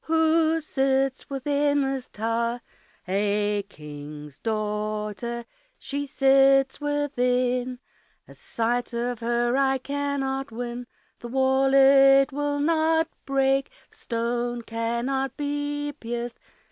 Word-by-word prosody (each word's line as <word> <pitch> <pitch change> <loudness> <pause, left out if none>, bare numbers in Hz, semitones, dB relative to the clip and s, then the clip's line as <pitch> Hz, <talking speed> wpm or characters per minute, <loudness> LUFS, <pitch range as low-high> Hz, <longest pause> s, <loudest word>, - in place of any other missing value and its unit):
Who 320 0 +3
sits 270 -2 0
within 285 +1 +1
this 270 -1 -3
tower? 230 +2 -1 0.5
A 205 +1 0
King's 150 -2 -10
daughter, 215 +2 -3 0.3
she 285 0 -4
sits 270 0 +4
within, 250 -4 0 0.5
A - - -13
sight 240 +2 -2
of 240 0 -2
her 240 +1 0
I 270 0 +2
cannot 270 -1 -2
win, 240 +1 -5 0.3
The 240 - -7
wall 265 +2 +2
it 275 0 +6
will 290 +1 -1
not 320 +1 +2 0.2
break, 270 0 +2 0.2
The - - -23
stone 240 +1 -2
cannot 235 +4 -2
be 290 0 -2
pierced. 240 0 -5
265 Hz, 105 wpm, -25 LUFS, 235-280 Hz, 0.5 s, it